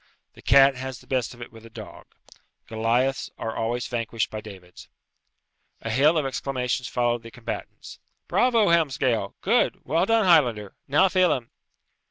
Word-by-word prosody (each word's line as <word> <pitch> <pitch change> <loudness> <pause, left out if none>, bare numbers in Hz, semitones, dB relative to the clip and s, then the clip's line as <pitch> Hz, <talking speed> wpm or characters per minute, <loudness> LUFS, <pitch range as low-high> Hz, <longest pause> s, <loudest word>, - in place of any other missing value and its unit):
The - - -16
cat 140 0 +6
has 130 0 -6
the - - -18
best 130 -2 -2
of 120 - -9
it - - -12
with 115 -1 -15
a 115 - -13
dog. - - -11 0.6
Goliaths 120 +4 0
are 115 0 -5
always 120 +2 -2
vanquished 115 -2 -3
by 110 - -5
Davids. 95 -4 -13 0.9
A 110 - -4
hail 145 +8 +3
of 150 - 0
exclamations 130 -2 -2
followed 120 -1 0
the 115 - -11
combatants. 115 -1 -8 0.3
"Bravo, 230 -5 +3
Helmsgail! 130 -10 +1
Good! - - +1
Well 165 +7 +1
done, 225 -2 +3
Highlander! 120 - +3
Now, 150 +8 +4
Phelem!" 180 -10 +1
125 Hz, 155 wpm, -24 LUFS, 115-145 Hz, 0.9 s, cat